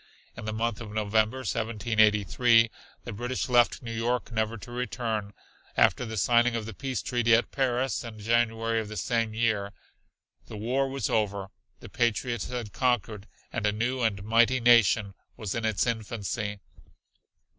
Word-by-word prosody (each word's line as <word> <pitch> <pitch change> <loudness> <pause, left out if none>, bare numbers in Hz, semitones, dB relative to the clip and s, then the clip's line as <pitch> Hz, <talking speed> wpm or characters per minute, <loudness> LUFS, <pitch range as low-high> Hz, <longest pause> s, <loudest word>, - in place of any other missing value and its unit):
In 115 - -8
the 110 - -2
month 115 +1 -2
of 110 -2 -7
November, 110 +3 +1
1783, 110 +1 +3 0.3
the 120 - -6
British 125 +4 -3
left 120 +1 +3
New 115 -1 -5
York 120 +2 -1
never 110 0 -1
to 120 - -11
return, 115 -4 -3 0.5
after 125 - +3
the 110 0 -5
signing 120 +3 +3
of 115 -2 -3
the 110 - -7
peace 130 +5 -4
treaty 120 -2 +3
at 115 - 0
Paris 130 -1 0
in 115 -2 -8
January 115 +1 +1
of 110 - -4
the 110 0 -7
same 115 -3 -1
year. 110 -3 0 0.7
The 110 - -8
war 130 +6 0
was 135 0 -2
over, 100 -3 -1 0.3
the - - -10
patriots 120 -2 -1
had 120 -5 -5
conquered, 115 -5 -1 0.3
and 105 - 0
a - - +3
new 120 +5 -1
and 100 -4 0
mighty 115 +4 +3
nation 115 -4 +4 0.2
was 105 -4 -4
in 115 -1 -2
its 110 -3 +1
infancy. 105 -2 -3
115 Hz, 160 wpm, -27 LUFS, 110-120 Hz, 0.7 s, nation